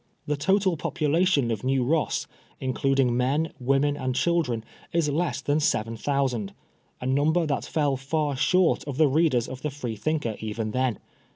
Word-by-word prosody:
The 150 - 0
total 190 +3 +2
population 150 -3 +1
of 110 -3 -3
New 130 0 +1
Ross, 155 +5 0 0.3
including 130 -1 +1
men, 140 +6 0
women 135 +3 +2
and 130 -3 -2
children, 145 -9 +1 0.3
is 165 -2 +1
less 165 +5 -1
than 145 +1 +1
seven 115 -6 0
thousand; 125 -4 -1 0.4
a - - -6
number 150 +6 +2
that 140 -3 -1
fell 145 -4 0
far 145 +2 -1
short 170 +6 +2
of 140 -3 -5
the 155 -1 +5
readers 140 -4 +2
of 130 0 -8
the 150 - -2
Free 130 -5 -5
^ - - -19
thinker 135 -4 -1
even 110 0 -3
then. 130 -2 0
140 Hz, 170 wpm, -26 LUFS, 125-155 Hz, 0.4 s, the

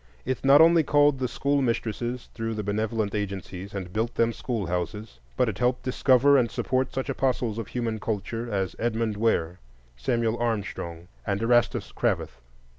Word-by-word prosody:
It 130 -1 -2
not 140 +2 +7
only 165 0 +7
called 145 -1 +3
the 130 - 0
school 140 +4 0
mistresses 120 0 -2
through 115 -1 -3
the 105 - -3
benevolent 110 +1 -1
agencies 100 -1 -5
and 90 -2 -5
built 115 +2 -1
them 115 0 +2
schoolhouses, 100 - -3 0.2
but - - +3
it - - -3
helped 125 +1 +1
discover 130 +2 +4
and 120 -2 +1
support 130 0 -1
such 130 - -3
apostles 125 -4 0
of 110 - -5
human 115 -3 -3
culture 115 +2 -3
as 95 -2 -1
Edmund 115 -2 0
Ware, 90 -6 0 0.4
Samuel 115 - 0
Armstrong, 100 -7 -3 0.2
and 100 -1 -1
Erastus 120 0 +2
Cravath. 65 - -1
115 Hz, 160 wpm, -26 LUFS, 100-125 Hz, 0.4 s, not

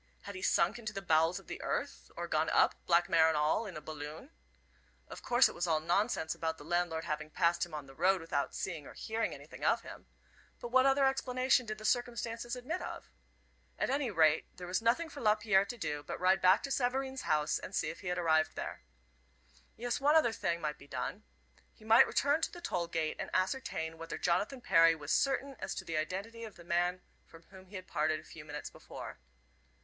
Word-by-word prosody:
Had 200 - -7
he 185 - -7
sunk 185 +5 +2
into 215 -2 -5
the 195 - -4
bowels 165 +1 +3
of - - -10
the - - -7
earth, - - -3
or - - -3
gone - - +1
up, - - +4
black 175 0 +4
mare 165 -3 +5
and 160 -1 +2
all, 155 +9 +1
in 185 - -7
a - - -7
balloon? 155 - -8 0.8
Of - - -9
course 245 +1 +5
it - - -7
was 175 +1 -2
all 160 -2 +2
nonsense 170 0 0
about 160 0 -3
the 145 - -11
landlord 175 -1 0
having 155 -2 -3
passed 170 +1 +1
him 160 - -8
on 150 -2 -6
the 135 - -14
road 185 +6 +3
without 165 -4 -2
seeing 165 -6 -4
or - - -12
hearing 225 +1 -2
anything - - -10
of - - +2
him. - - -11 0.5
But 240 - -6
what 260 +2 +5
other 270 0 +4
explanation 255 -2 +2
did 215 0 -4
the 215 - -9
circumstances 235 0 -1
admit 260 +9 -4
of? - - -7 0.7
At - - 0
any 275 -2 0
rate, 160 -5 +3
there 180 - -7
was 180 +4 -1
nothing 240 +9 +2
for 295 -3 -9
Lapierre 210 -3 +3
to 240 +3 -7
do 150 -8 -3
but - - -6
ride 185 +1 +3
back 185 +2 +5
to 275 - -4
Savareen's 265 +1 -1
house 150 0 +2
and 195 - -7
see - - 0
if - - -12
he 190 - -8
had 180 0 -1
arrived 160 -2 +2
there. - - -5 1.0
Yes, 245 +4 -2
one 295 +3 +4
other 270 -8 +4
thing 170 -5 -1
might 150 -2 -3
be 140 - -14
done. 125 -3 -4 0.5
He 215 - -17
might 225 +1 +7
return 290 +3 +2
to - - 0
the 350 - -9
toll 180 - -2
gate 160 -2 -2
and - - -4
ascertain 185 -5 -1
whether 165 0 -5
Jonathan 205 +9 0
Perry 165 -5 +5
was 150 -1 -6
certain 275 +5 +1
as - - -4
to - - -5
the 160 - -2
identity 200 +9 -4
of 220 -3 -8
the 175 - -13
man 175 +1 0 0.3
from 165 0 -15
whom 190 -1 -13
he 200 - -12
had 185 0 -6
parted 155 -2 0
a - - -14
few 160 -1 -11
minutes 150 0 -7
before. - - -9
185 Hz, 220 wpm, -33 LUFS, 160-235 Hz, 1.0 s, might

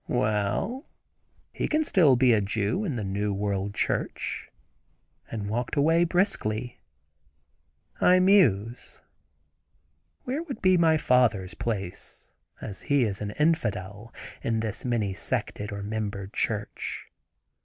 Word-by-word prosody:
"Well! 110 - -1 0.6
he - - -2
can 310 0 +2
still 165 - +5
be 125 -1 +4
a 110 - +3
Jew, 105 - -1
in 155 -9 -2
the 110 - -3
new 100 +2 -1
world 100 0 -2
church," - - -2 0.8
and 105 -3 -4
walked 120 +3 -2 0.3
briskly 125 - -1 1.2
around. - - +6
I - - +6
muse. 125 - +3 1.2
Where 265 +5 -2
would 290 -9 -6
be 185 0 +4
my 165 -2 +4
father's 115 - +2
place, 100 -5 -5 0.3
as 100 -3 -7
he 140 -2 +4
is 100 -3 -2
an 105 - -3
infidel, 110 - -1 0.3
in 115 -1 0
this 110 -2 -4
many 115 -6 0
sected 105 -1 -3
or 100 0 -5
membered 105 -2 -4
church. 105 -2 -2
110 Hz, 120 wpm, -27 LUFS, 100-150 Hz, 1.2 s, around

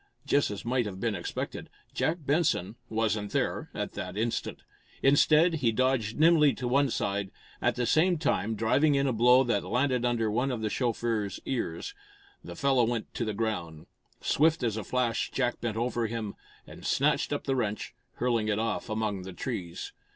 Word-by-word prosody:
Just 145 - +2
as 105 +1 -6
might 120 -1 +1
have 95 -2 -7
been 115 +1 0
expected, 90 -3 -5 0.2
Jack 160 +2 0
Benson 140 - +1 0.2
wasn't 110 -2 -1
there - - -1
at - - -3
that 95 - -6
instant. 115 +1 -2 0.4
Instead, 155 +4 +5
he 115 -3 +3
dodged 120 -2 0
nimbly 155 -3 +6
to 125 - -3
one 140 +2 +3
side, 100 -3 -1 0.3
at - - +2
the 125 - 0
same 175 +7 +3
time 115 -7 0
driving 135 +8 +3
in 140 0 +2
a 130 - +1
blow 125 +3 +5
that 120 -2 0
landed 125 0 0
under 115 -3 +1
one 125 +5 +1
of 120 -4 -3
the 110 -1 -1
chauffeur's 115 -4 -1
ears. 135 - -3 0.5
The - - -8
fellow 135 -3 +3
went 115 -1 -2
to 120 - -2
the 110 -2 -3
ground. 85 -8 -3 0.4
Swift 160 0 +2
as 115 -3 0
a 110 - -3
flash 125 +1 0
Jack 125 -2 -1
bent 110 -2 -2
over 120 0 0
him, 110 -2 -4 0.3
and - - -12
snatched - - +1
up - - -2
the 135 - 0
wrench, 110 -4 -2 0.2
hurling 115 -3 0
it 105 -1 +1
off 110 -3 -2
among 110 -3 -1
the 95 0 -8
trees. 90 -7 -5
120 Hz, 180 wpm, -29 LUFS, 110-130 Hz, 0.5 s, nimbly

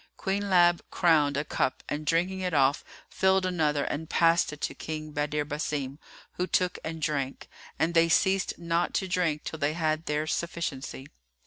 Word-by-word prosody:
Queen 200 0 -2
Lab 175 -2 +5
crowned 150 -5 +3
a 145 - -1
cup 130 - -1
and 150 +1 -4
drinking 180 +4 +1
it 180 -3 -2
off, 135 +1 +3 0.2
filled 190 0 +2
another 155 -5 +1
and 160 +2 -4
passed 165 -1 +3
it 150 - -9
to - - -2
King 155 -1 -6
Badr 150 0 -1
Basim, 145 -2 -3 0.4
who 180 - 0
took 180 -1 +1
it - - -14
and 160 0 -5
drank; 140 -3 -2 0.3
and 165 +1 +1
they 165 0 +4
ceased 190 +2 +2
not 170 0 -1
to 190 - 0
drink 170 -5 0
till 160 - -6
they 145 0 +1
had 160 -1 -1
their 150 +1 0
sufficiency. 155 -5 -3
160 Hz, 180 wpm, -28 LUFS, 150-175 Hz, 0.4 s, Lab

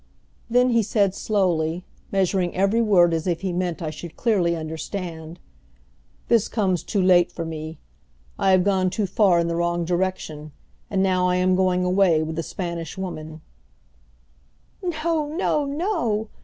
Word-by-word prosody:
Then 250 +2 +3
he 230 -1 +4
said 200 -2 +1
slowly, 180 -5 0 0.3
measuring 190 -2 0
every 200 +5 +2
word 180 -6 +4
as 165 +2 -2
if 170 -1 -1
he 190 -2 -2
meant 175 -1 -2
I 155 - -3
should 155 +2 -10
clearly 185 -8 +1
understand: 160 +1 -6 0.9
"This 230 -2 +3
comes 190 -6 0
too 200 -4 -1
late 180 -1 +4
for 170 - -5
me. 160 0 -6 0.6
I - - +2
have 185 -1 +5
gone 190 -2 +2
too 200 +3 -1
far 190 -1 +3
in 170 - 0
the 170 - -1
wrong 170 0 0
direction, 170 -4 -3 0.4
and 195 -1 +1
now 185 -1 +2
I 180 - +2
am 185 0 +2
going 185 -1 +2
away 180 -3 +3
with 160 0 -4
the 165 - -1
Spanish 170 -1 -5
Woman." 160 -4 -6 1.4
"No, 325 -3 -1
no, 300 -2 0
no!" 280 - -1
185 Hz, 155 wpm, -23 LUFS, 170-200 Hz, 1.4 s, have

